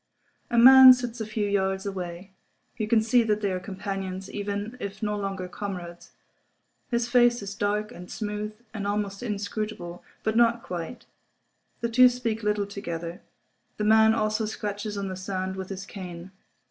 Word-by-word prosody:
A 235 - 0
man 260 +2 +11
sits 245 -2 -5
a 220 - -3
few 215 -1 -1
yards 190 -1 0
away. 185 -1 -6 0.4
You 220 -3 -2
can 220 0 +3
see 235 +2 +4
that 215 -2 0
they 200 -2 0
are 185 - -2
companions, 195 -1 -5
even 205 +3 -4
if 200 -1 -6
no 210 0 0
longer 195 -2 -3
comrades. 180 -3 -7 0.8
His 235 -2 0
face 240 -2 +4
is 200 0 -5
dark 210 +2 -1
and 180 -6 -10
smooth, 210 0 -4 0.2
and 200 -3 -3
almost 205 -1 -2
inscrutable—but 210 -2 -4
not 235 0 +3
quite. 175 +5 -6 0.8
The 235 - 0
two 250 +2 +7
speak 235 -3 -3
little 210 -1 0
together. 175 -4 -6 0.6
The 210 - -2
man 220 +1 +5
also 215 0 0
scratches 210 -1 -4
on 200 -1 -3
the 185 - -4
sand 190 0 -4
with 190 -1 -6
his 190 -1 -6
cane. 180 -2 -8
205 Hz, 160 wpm, -26 LUFS, 190-220 Hz, 0.8 s, man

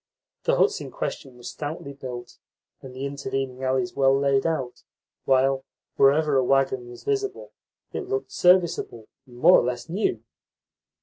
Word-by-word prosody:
The - - +3
huts 425 -3 +2
in - - -7
question 135 - -5
were 120 - -15
stoutly 145 0 -6
built 125 -3 -8 0.4
and 135 - -10
the 135 +2 -4
intervening 135 -2 -4
alleys 130 +8 0
well 135 0 +3
laid 140 +1 +2
out; 135 -7 -3 0.4
while, 135 0 +3 0.3
wherever 145 +1 +4
a 130 - +3
waggon 130 -2 +1
was 120 - -12
visible, 405 -1 -2 0.4
it 385 - -4
looked 410 0 -2
serviceable 175 -11 +2 0.2
and 120 -1 -15
more 170 +8 +7
or - - 0
less 125 +5 -3
new. 170 - -1
135 Hz, 150 wpm, -25 LUFS, 130-165 Hz, 0.4 s, more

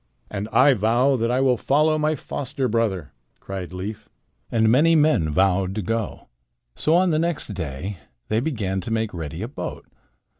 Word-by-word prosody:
"And 105 +1 -4
I 135 +2 +6
vow 120 +5 +2
that 115 0 0
I 125 +2 +1
will 130 -2 +3
follow 155 +5 +2
my 155 +1 +1
foster 135 -1 -3
brother," 105 - -1 0.3
cried 95 -2 -6
Leif. 105 +4 -6 0.4
And 110 -1 +3
many 150 +9 +5
men 150 - +3
vowed 95 +3 +1
to 105 - -2
go. 115 +2 -3 0.5
So 155 - +2
on 180 0 +4
the 155 - +2
next 170 -5 0
day 90 0 -5 0.3
they 110 - +1
began 105 -9 -2
to 115 - -6
make 110 -1 -1
ready 80 +2 -5
a - - -3
boat. 135 - -6
115 Hz, 175 wpm, -23 LUFS, 95-140 Hz, 0.5 s, I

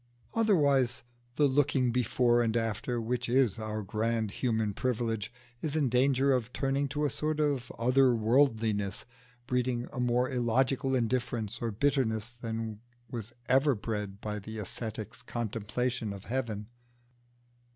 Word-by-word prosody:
Otherwise, 145 - +3 0.3
the 150 - +4
looking 135 -2 +2
before 120 0 +3
and 115 0 +1
after, 115 +2 -1
which 120 +1 -2
is 120 -4 +3
our 110 -1 -3
grand 110 +2 -1
human 110 -3 0
privilege, 115 -2 -1 0.3
is 155 -2 -2
in 145 -5 +2
danger 135 +2 +3
of 125 -2 -1
turning 135 +1 0
to 150 +2 -1
a - - +2
sort 155 0 -1
of 145 -5 0
other 125 +1 +4
worldliness, 110 -4 +2 0.4
breeding 125 -1 0
a 125 - -4
more 125 +1 +2
illogical 130 +2 +1
indifference 120 -3 -1
or 115 - 0
bitterness 115 -2 0
than 115 -2 -5 0.3
was 115 -2 -5 0.2
ever 135 +2 +4
bred 105 -2 -4
by 105 0 -4
the 110 +2 -8
ascetic's 110 +1 -5
contemplation 115 0 -2
of 100 -1 -9
heaven. 115 -4 -3
120 Hz, 135 wpm, -30 LUFS, 110-130 Hz, 0.4 s, the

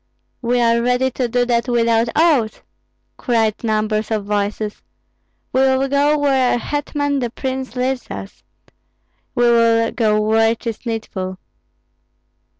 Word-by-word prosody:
"We 245 0 +1
are 235 0 +3
ready 250 +2 +1
to 250 0 -1
do 245 +1 +1
that 235 -1 0
without 230 -1 +2
oaths!" 300 -9 +2 0.5
cried 225 -3 0
numbers 215 -1 0
of 215 -3 -2
voices. 210 +1 -2 0.7
"We 260 - +3
will 265 0 +2
go 285 +2 +2
where 270 -3 +2
our - - +1
hetman 285 +2 -2
the 245 -2 -2
prince 260 +1 -5
leads 255 0 -2
us; 195 - -8 0.9
we 240 - +2
will 230 -1 +3
go 215 -2 +1
where 225 +1 +3
'tis 230 +1 -6
needful." 190 -5 -4
235 Hz, 135 wpm, -19 LUFS, 220-260 Hz, 0.9 s, are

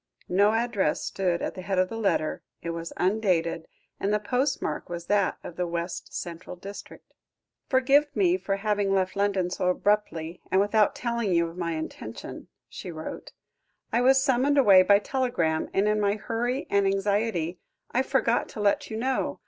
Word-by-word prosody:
No 200 +4 +4
address 225 -8 0
stood 180 -3 -1
at - - -2
the 185 - -7
head 190 +1 -2
of 185 0 +2
the - - -6
letter, 195 -8 0 0.2
it 170 - -2
was 165 0 -5
undated; 180 -4 +1 0.3
and 200 - 0
the 210 - +3
postmark 250 - -1
was 170 -1 -5
that 200 0 +1
of 175 - -9
the 180 -1 -1
West 170 +1 -4
Central 170 0 -6
district. 195 +3 -11 0.6
"Forgive 275 +3 +4
me 185 -4 +3
for 195 +1 -2
having 200 -1 0
left 185 0 0
London 200 -3 0
so 180 - -1
abruptly, 180 -4 0
and 190 - +3
without 205 +1 +3
telling 235 -4 -1
you 170 0 +3
of 165 - -10
my 170 -2 -2
intention," 160 0 -7 0.2
she - - -8
wrote. - - -7 0.6
"I 235 - +3
was 265 +2 +5
summoned 270 +1 +2
away 200 -9 +7
by 200 +2 +6
telegram, 205 -10 -1
and 195 +2 +2
in 210 0 +2
my 200 0 +2
hurry 240 +5 -2
and 200 -1 +3
anxiety, 195 -3 0 0.3
I 250 - +2
forgot 265 -3 +1
to - - -9
let 205 -1 +1
you 220 - -4
know. 260 +3 -1
200 Hz, 175 wpm, -26 LUFS, 180-225 Hz, 0.6 s, away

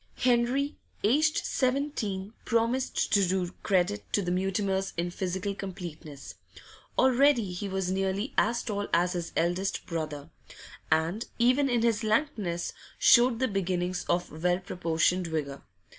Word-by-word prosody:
Henry, 250 +4 +1 0.2
aged 300 +9 +2
seventeen, 250 -7 -1
promised 235 +3 0
to 200 -2 +5
do 180 -1 -1
credit 195 +1 +1
to 205 - +2
the 175 - -2
Mutimers 190 +1 -1
in 175 +1 -1
physical 190 +2 -3
completeness; 170 -7 -8 0.6
already 260 -5 +4
he 195 +3 -4
was 190 -1 -1
nearly 195 +5 -1
as 235 +2 +2
tall 205 -2 -3
as 175 +1 +2
his 175 -2 -4
eldest 175 +4 0
brother; 155 -4 -5 0.6
and, 165 +8 +1
even 255 +4 +3
in 240 -2 +1
his 230 -1 +1
lankness, 215 - -1 0.2
showed 240 -1 +6
the 260 +2 +1
beginnings 185 -3 -1
of 175 -3 -1
well 180 0 +3
proportioned 180 -1 0
vigour. 145 -4 -3
195 Hz, 130 wpm, -28 LUFS, 175-235 Hz, 0.6 s, showed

